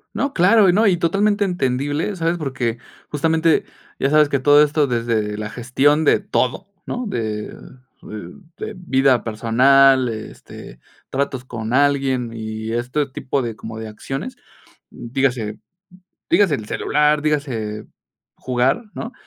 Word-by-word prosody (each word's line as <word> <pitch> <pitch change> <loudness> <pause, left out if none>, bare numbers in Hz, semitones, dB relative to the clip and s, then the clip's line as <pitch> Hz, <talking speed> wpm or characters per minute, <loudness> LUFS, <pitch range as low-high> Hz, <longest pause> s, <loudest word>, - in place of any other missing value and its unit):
No, 280 0 -1
claro. 195 +2 +5
Y - - +4
no, 215 +2 +4
y 180 -3 +3
totalmente 200 +4 +1
entendible, 145 +2 -1
¿sabes? 170 0 -1
Porque 130 -6 -2 0.3
justamente, 160 +2 +1 0.3
ya 135 - +1
sabes 150 -1 +4
que 140 - 0
todo 145 +2 +6
esto 150 -1 +1
desde 115 -3 -1
la 110 0 -4
gestión 140 +6 +1
de - - +4
todo, 130 +10 -1 0.2
¿no? 245 0 -4
De 110 - -4 0.5
de 95 -5 -9 0.2
de - - -6
vida 135 -7 +2
personal, 130 +4 +4
este, 110 -1 -9 0.3
tratos 135 -2 -2
con 115 -1 -5
alguien 135 -4 +1
y 110 0 -5
este 125 +5 -1
tipo 135 +1 -3
de 115 -3 -4
como 110 0 -8
de 110 - -6
acciones. 135 - -6 0.5
Dígase 120 -3 -2 0.7
dígase 190 -8 +4
el 110 - -7
celular, 150 +4 +1
dígase 120 -9 -2 0.5
jugar, 130 - 0
¿no?, 230 - -6
135 Hz, 135 wpm, -20 LUFS, 115-155 Hz, 0.7 s, todo